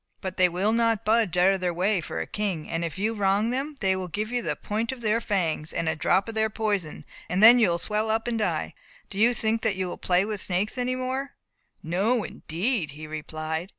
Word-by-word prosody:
But 185 -1 -6
they 180 -1 +5
will 185 +5 0
not 230 -2 +1
budge 215 -5 +2
out 185 +2 +5
of 190 - -3
their 175 -2 -1
way 190 +1 +1
for 110 - -5
a 80 - -2
king; 190 - -3
and 165 +1 -2
if 165 0 -4
you 215 +4 0
wrong 205 +2 +1
them, 275 +4 -3
they 190 -1 +2
will 185 -1 -4
give 210 +6 -3
you 245 0 0
the - - -2
point 220 +3 -2
of 260 -2 -8
their 225 +1 +1
fangs, 170 -8 -1
and 165 - -2
a 160 - +1
drop 190 +6 +2
of 225 - -5
their 220 0 +1
poison, 205 -7 -2 0.2
and 185 +4 +1
then 240 +3 +10
you 220 -6 +4
will 170 - +1
swell 210 +5 -1
up 225 +2 0
and 230 -2 -1
die. 210 - -1 0.4
Do 195 - -5
you 240 +3 +4
think 225 0 0
that 220 -3 0
you 185 0 -2
will 175 - -6
play 180 +1 +2
with 210 -2 -4
snakes 190 +3 -1
any 250 0 -1
more!" 260 +2 -3 0.5
"No, 205 +8 +1
indeed," 175 - -2
he 155 - -7
replied. 155 +2 -5
205 Hz, 240 wpm, -26 LUFS, 180-225 Hz, 0.5 s, then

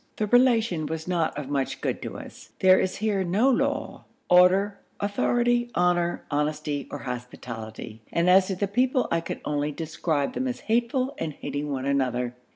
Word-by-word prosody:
The 215 - -1
Relation 225 - +3
was 160 +1 -5
not 170 -5 0
of 145 -3 -4
much 140 -2 -2
good - - -2
to - - -6
us. - - -12
There 185 0 +6
is 185 - -1
here 205 -2 0
no 205 +10 +3
law, - - -1 0.3
order, 190 +3 +5 0.2
authority, 240 +4 +1
honour, 175 -1 +1
honesty, 150 0 -1
or - - -5
hospitality, 120 -3 -7
and 170 +1 +1
as 185 +1 +6
to 190 - -2
the 200 +2 -1
people, 250 +5 +1
I 165 - +2
can 165 - -5
only 150 0 -1
describe 155 -2 -2
them 260 - -2
as 250 - -4
hateful 240 +4 0
and 155 - -3
hating 145 +1 -4
one 135 -1 -3
another. 125 -3 0
175 Hz, 170 wpm, -26 LUFS, 145-210 Hz, 0.3 s, There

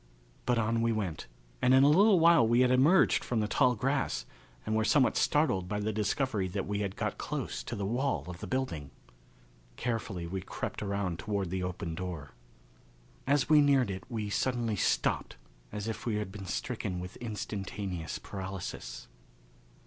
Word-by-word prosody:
But 125 -1 +3
on 115 +1 +1
we 115 0 +2
went, 100 -7 -3 0.3
and 130 - +5
in 135 - +7
a - - +7
little 190 +5 +6
while 165 -8 +6
we 120 +2 +4
had 125 0 +4
emerged 140 +9 +5
from 120 - -1
the 105 - +1
tall 125 +2 +3
grass 130 - -1 0.4
and 110 - 0
were 110 - +2
somewhat 130 +3 +3
startled 145 - +2
by 105 - -1
the 105 +1 -1
discovery 105 0 0
that 95 +2 -3
we 100 0 -2
had 100 -2 -2
got - - -3
close - - -3
to 120 - -5
the 100 -2 -3
wall 130 +6 0
of 90 -1 -7
the - - -6
building. 130 - -2 0.9
Carefully 110 -7 -3
we 95 +2 -4
crept - - -5
around 100 -4 -2
toward 100 -4 -2
the 95 0 -1
open 90 -2 -4
door. 85 -5 -5 1.0
As 140 -2 +3
we 150 0 +6
neared 135 -6 +3
it 95 - -5
we 110 -4 -3
suddenly 120 -1 0
stopped - - 0 0.4
as 105 +1 -4
if 115 - -4
we 110 - +1
had 105 -2 -3
been 100 -1 -8
stricken 100 -3 -3
with 90 +1 -7
instantaneous 100 -6 -4
paralysis. 95 -11 -6
105 Hz, 175 wpm, -31 LUFS, 95-125 Hz, 1.0 s, in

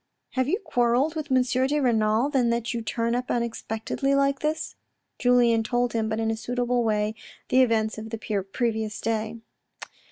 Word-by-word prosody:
" - - -54
Have 260 0 0
you 370 - +1
quarelled 260 - +1
with 310 -3 -5
M. 255 -1 +4
de 260 +4 +1
Renal 230 0 +2
then 255 -4 +2
that 235 +2 -1
you 235 - -2
turn 230 +1 -1
up 250 +1 -2
unexpectedly 235 +3 -1
like 275 0 +2
this? 305 +1 -2 0.2
" - - -52
Julien 245 -2 +4
told 245 +2 0
him, 220 -1 0
but 220 0 -1
in 225 0 0
a - - -1
suitable 245 +1 -1
way, 210 -1 0 0.4
the 260 - +5
events 220 -3 +1
of 220 +1 -7
the 215 -3 -3
previous 220 -3 -1
day. 220 0 -2
235 Hz, 185 wpm, -25 LUFS, 220-260 Hz, 0.4 s, the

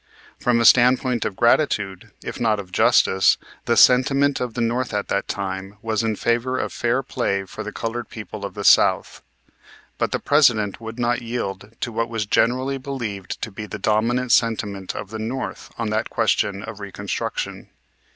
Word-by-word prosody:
From 120 -1 +2
a 115 - +2
standpoint 125 0 +4
of 95 - -3
gratitude, 105 -6 +1
if - - -6
not 110 -3 +1
of 95 -2 -8
justice, 95 0 +4 0.3
the - - +1
sentiment 135 +2 +5
of 125 -3 -4
the - - -3
North 120 0 -1
at 100 - -2
that 100 - -1
time 95 0 -4
was 110 -1 0
in 110 -1 -1
favor 120 +4 0
of - - -3
fair 120 +3 0
play 100 -7 -1
for - - -8
the - - -6
colored 115 +1 -4
people 110 -1 -8
of 100 - -6
the 100 - -5
South. - - +4 0.8
But - - 0
the - - +1
President 115 -9 +2
would 115 +1 -7
not 120 0 0
yield 115 -3 -5
to 120 - -2
what 115 +1 -2
was 115 -2 -2
generally 130 +6 +1
believed 120 -8 -5
to 110 - -4
be 105 +2 -7
the 110 - -6
dominant 115 +5 +1
sentiment 105 -5 0
of 100 - -6
the 110 - -5
North 120 +4 -5
on 115 -2 -2
the 110 +1 +1
question 100 -3 0
of 110 -1 -8
reconstruction. 100 -3 -4
115 Hz, 180 wpm, -22 LUFS, 100-120 Hz, 0.8 s, sentiment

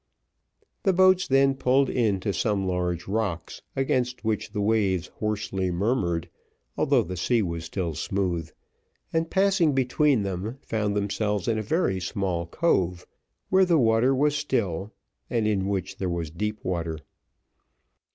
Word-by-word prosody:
The 195 - +2
boats 185 0 +4
then 135 0 +4
pulled 135 +1 +2
in 110 -7 +1
to 100 +1 -1
some 100 0 0
large 90 -1 -2
rocks, 95 -5 -3
against 125 -3 -1
which 110 -2 -1
the 105 - -3
waves 100 -4 +1
hoarsely 105 -3 -1
murmured, 90 -3 0 0.5
although - - +3
the 90 +2 -6
sea 115 +5 +1
was 85 -2 -4
still 85 -1 -3
smooth, 85 -1 -2 0.6
and 165 0 0
passing 190 -5 +3
between 130 -1 +2
them, 100 +6 -4
found 105 -2 -1
themselves 105 0 -1
in 110 -2 +1
a - - -1
very 110 - 0
small 90 -2 -2
cove, 90 - 0 0.4
where 190 0 +5
the 175 -3 +3
water 120 +1 +3
was 145 +2 +2
still, 110 - -1 0.4
and 115 -3 0
in 100 -3 0
which 95 -2 -3
there 95 - -2
was 85 -3 -3
deep 105 +5 -4
water. 85 -3 -2
105 Hz, 145 wpm, -26 LUFS, 90-130 Hz, 0.6 s, where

